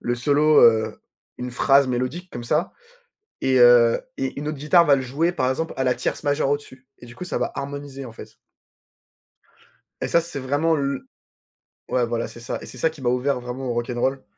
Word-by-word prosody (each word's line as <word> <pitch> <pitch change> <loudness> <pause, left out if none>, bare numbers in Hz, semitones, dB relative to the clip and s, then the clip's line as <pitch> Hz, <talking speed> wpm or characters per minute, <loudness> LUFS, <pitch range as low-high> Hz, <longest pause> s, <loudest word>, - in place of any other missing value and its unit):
le 120 - -1
solo, 145 +4 +4
heu, 110 -1 +4 0.4
une 125 0 -5
phrase 135 +2 +3
mélodique 130 +9 -3
comme 120 - -7
ça 150 +9 0 0.7
et 130 -1 +3
heu 120 -1 +6 0.2
et 135 0 -3
une 150 +1 -4
autre 155 - -4
guitare 170 +4 +4
va 140 -1 +5
le 130 - -2
jouer, 150 +7 0
par 130 -7 0
exemple, 160 +5 -2
à 130 - -1
la 125 - +2
tierce 120 - -3
majeure 145 -1 +1
au-dessus 130 -2 -4
et 120 - -13
du 120 - -13
coup, 180 - -6
ça 180 - -3
va - - -1
harmoniser, 140 -1 -6
en 115 - -10
fait. 110 -1 -12 1.7
Et - - -1
ça, 170 - +3
c'est 165 -4 -6
vraiment 145 +5 +1
l 140 -2 -2 0.9
ouais, 125 -2 +1
voilà, 115 0 -2
c'est 120 - -12
ça 120 - -4
et - - -10
c'est 125 - -11
ça 160 +6 +2
qui 155 -4 -14
m'a 125 - 0
ouvert 125 +1 0
vraiment 125 +2 -6
au - - 0
rock 120 +1 -2
n' 120 - -4
roll. 135 +2 -1
135 Hz, 215 wpm, -23 LUFS, 120-145 Hz, 1.7 s, heu